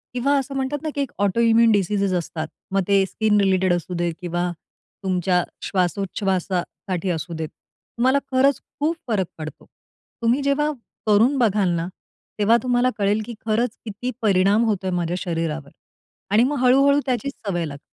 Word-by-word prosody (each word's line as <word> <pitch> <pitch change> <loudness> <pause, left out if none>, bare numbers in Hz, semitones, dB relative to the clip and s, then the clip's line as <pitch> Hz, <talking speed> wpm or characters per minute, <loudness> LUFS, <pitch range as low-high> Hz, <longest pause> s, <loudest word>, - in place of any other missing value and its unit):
किंवा 275 +3 +2
असं 275 +1 -5
म्हणतात 270 +2 -1
ना, 310 - -1
की 285 - 0
एक 275 - -3
ऑटोइम्यून 230 +3 +4
डिसीसेज 200 -1 +1
असतात. 160 -2 -3 0.2
मग 195 0 +2
ते 195 -1 +4
स्किन 210 +1 +1
रिलेटेड 190 -2 +3
असू 175 +1 -3
देत 175 -1 -1
किंवा 175 0 -2 0.6
तुमच्या 180 -1 +1 0.2
श्वासोच्छवासासाठी 185 -1 -1
असू 165 +1 -4
देत. 160 -1 -3 0.5
तुम्हाला 260 +3 +3
खरंच 260 +1 +3 0.2
खूप 315 +3 +1
फरक 205 -5 +1
पडतो. 155 0 -8 0.6
तुम्ही 235 +4 +2
जेव्हा 295 +2 +2 0.4
करून 230 +7 +4
बघाल 210 -6 +2
ना, 170 +1 -2 0.5
तेव्हा 225 +3 +5
तुम्हाला 250 0 +2
कळेल 205 +1 +1
की 235 - -7
खरंच 225 +1 0
किती 225 +4 -4
परिणाम 200 +1 +3
होतोय 195 -4 0
माझ्या 175 -1 -1
शरीरावर 165 -5 -3 0.6
आणि 220 +3 +5
मग 285 +2 0
हळू-हळू 275 +3 +5
त्याची 255 0 -1
सवय 190 -10 -3
लागते. 140 -2 -7
205 Hz, 155 wpm, -22 LUFS, 180-245 Hz, 0.6 s, तेव्हा